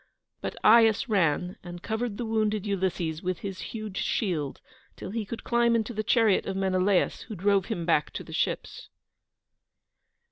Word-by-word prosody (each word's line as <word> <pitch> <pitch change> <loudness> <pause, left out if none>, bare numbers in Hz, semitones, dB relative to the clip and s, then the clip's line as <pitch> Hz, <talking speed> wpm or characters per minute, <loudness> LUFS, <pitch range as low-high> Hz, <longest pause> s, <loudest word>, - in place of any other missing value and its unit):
But - - -4
Aias 225 +1 +6
ran 180 -3 +1
and 175 0 -9
covered 220 -1 -2
the 240 - -3
wounded 215 -2 0
Ulysses 180 -5 -1
with 185 -1 -3
his 195 -2 -5
huge 215 -3 -6
shield 170 - -1 0.4
till - - -7
he 220 0 -3
could 230 +4 -7
climb 235 -1 +2
into 230 +1 -1
the 215 - -1
chariot 220 -2 +3
of 195 -1 -2
Menelaus, 190 0 +1
who 215 - -6
drove 195 +1 +2
him 170 - -3
back 160 -3 +2
to - - -5
the - - -11
ships. - - -2
200 Hz, 165 wpm, -27 LUFS, 180-220 Hz, 0.4 s, Aias